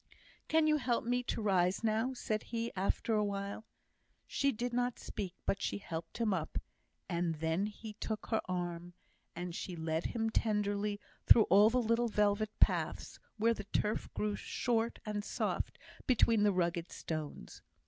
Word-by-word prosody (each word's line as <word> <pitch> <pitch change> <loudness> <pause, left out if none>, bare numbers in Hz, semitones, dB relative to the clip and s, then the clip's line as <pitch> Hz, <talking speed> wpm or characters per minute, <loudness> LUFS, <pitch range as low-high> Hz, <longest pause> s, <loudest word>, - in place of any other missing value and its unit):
"Can 320 0 +4
you 305 -1 +4
help 245 -4 0
me 245 +1 +1
to 225 - -2
rise 185 -1 +2
now?" 225 +3 +1
said 215 -3 -1
he, 230 0 -3
after 195 +4 0
a 210 -1 +3
while. 200 +1 -3 0.6
She 280 0 +1
did 240 +1 -3
not 245 0 0
speak, 185 -3 -5
but 195 - 0
she - - -1
helped 165 -4 -6
him 225 -4 +1
up, 165 -4 -2 0.5
and 170 -2 0
then 160 +5 0
he 215 +1 -8
took 215 0 -4
her 220 - +2
arm, 175 -1 -4 0.4
and 175 0 -4
she 180 +1 -5
led 160 0 -2
him 225 -1 -1
tenderly 205 -2 0 0.3
through 225 - +9
all 205 +3 +8
the 250 - +1
little 230 0 +2
velvet 210 0 +2
paths, - - +1 0.2
where 230 +2 +3
the 205 -3 -7
turf 210 +1 -1
grew 210 -1 0
short 230 +1 -1
and 210 -1 -2
soft - - -2 0.3
between 230 -4 +4
the 205 0 +5
rugged 175 -2 0
stones. 155 - -6
210 Hz, 165 wpm, -34 LUFS, 180-230 Hz, 0.6 s, through